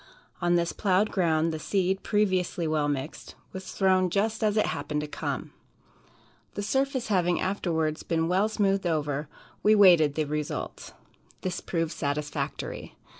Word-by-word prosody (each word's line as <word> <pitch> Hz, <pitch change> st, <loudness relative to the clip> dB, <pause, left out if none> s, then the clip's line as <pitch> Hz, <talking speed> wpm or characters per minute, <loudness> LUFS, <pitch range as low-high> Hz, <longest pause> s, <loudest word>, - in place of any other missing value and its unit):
On 175 Hz, 0 st, +3 dB
this 170 Hz, 0 st, +1 dB
plowed 200 Hz, +1 st, +2 dB
ground, 165 Hz, -3 st, +1 dB
the 160 Hz, -, -4 dB
seed, 190 Hz, +2 st, 0 dB
previously 185 Hz, -5 st, 0 dB
well 155 Hz, -1 st, +1 dB
mixed, 145 Hz, +1 st, -4 dB, 0.2 s
was 190 Hz, 0 st, -7 dB
thrown 185 Hz, -1 st, +3 dB
just 215 Hz, +4 st, 0 dB
as 215 Hz, 0 st, +2 dB
it 215 Hz, -, +4 dB
happened 150 Hz, 0 st, -2 dB
to 150 Hz, -, -4 dB
come. -, -, -4 dB, 1.0 s
The 205 Hz, -, -3 dB
surface 265 Hz, +2 st, 0 dB
having 180 Hz, -3 st, +2 dB
afterwards 160 Hz, -5 st, -1 dB
been 165 Hz, -1 st, 0 dB
well 190 Hz, +5 st, +2 dB
smoothed 195 Hz, -3 st, +1 dB
over, 150 Hz, -3 st, -1 dB, 0.3 s
we 215 Hz, +1 st, +5 dB
waited 170 Hz, -8 st, +6 dB
the 155 Hz, -, +1 dB
result. 150 Hz, 0 st, -4 dB, 0.5 s
This 185 Hz, -, -3 dB
proved 165 Hz, -2 st, -2 dB
satisfactory. 145 Hz, -2 st, -4 dB
175 Hz, 145 wpm, -27 LUFS, 155-195 Hz, 1.0 s, waited